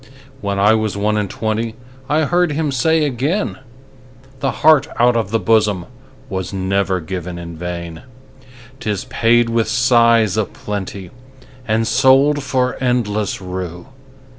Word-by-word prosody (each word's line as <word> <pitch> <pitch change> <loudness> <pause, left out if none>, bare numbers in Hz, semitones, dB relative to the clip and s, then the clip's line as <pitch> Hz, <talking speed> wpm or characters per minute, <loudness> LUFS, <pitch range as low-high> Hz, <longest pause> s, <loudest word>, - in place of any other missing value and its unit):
When 100 -3 -2
I 105 +2 +4
was 110 -3 -1
one 105 +1 0
and 105 -2 -1
twentyI 125 +8 -3
heard 175 0 +1
him 150 -1 -1
say 160 +4 +2
again,'The 130 - -5 0.2
heart 155 -2 +6
out 120 0 +4
of 115 -4 0
the 115 +2 0
bosomWas 105 -1 -2
never 95 0 0
given 90 +1 -6
in 85 -1 -8
vain;'Tis 115 +7 -8
paid 120 +1 +2
with 115 -2 +1
sighs 115 -3 +3
a 110 - +2
plentyAnd 115 +5 -6
sold 135 +5 +4
for 130 -2 -1
endless 110 -5 0
rue. 90 +2 -6
115 Hz, 115 wpm, -18 LUFS, 100-130 Hz, 0.2 s, heart